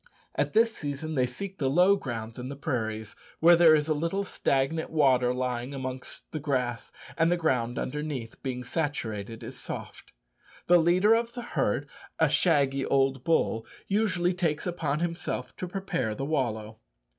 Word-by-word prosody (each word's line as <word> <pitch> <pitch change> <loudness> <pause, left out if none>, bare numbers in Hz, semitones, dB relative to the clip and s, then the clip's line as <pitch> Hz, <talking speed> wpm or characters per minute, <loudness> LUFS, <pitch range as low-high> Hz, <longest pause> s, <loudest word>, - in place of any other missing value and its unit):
At - - -1
this 225 +1 +4
season 145 +2 -4
they 130 -3 +2
seek 195 +10 -7
the 135 -3 +1
low 180 +7 +5
grounds 115 - -5
in 125 +1 -5
the 140 - -5
prairies 110 -7 -3 0.2
where 170 +2 +7
there 165 -2 +7
is 150 0 +1
a 155 - +2
little 170 +6 -1
stagnant 160 -3 0
water 130 -5 +3
lying 125 +1 -2
amongst 130 -1 -6
the 155 - -3
grass, 125 -5 -2 0.3
and 165 +1 +4
the 175 - +3
ground 125 -8 0
underneath, 140 -4 -4
being 125 -2 -3
saturated, 115 - -3
is - - -8
soft. - - -7 0.5
The 175 0 +6
leader 180 +6 +4
of 230 +1 0
the 245 - -5
herd, - - 0 0.3
a - - +4
shaggy 140 -5 +3
old 135 -2 +1
bull, 135 -8 +1 0.2
usually 185 -4 +1
takes 165 -4 -1
upon 165 -4 -1
himself 170 0 -3
to 185 - -4
prepare 180 - -2
the 135 - -3
wallow. 110 -7 -2
145 Hz, 165 wpm, -28 LUFS, 125-170 Hz, 0.5 s, where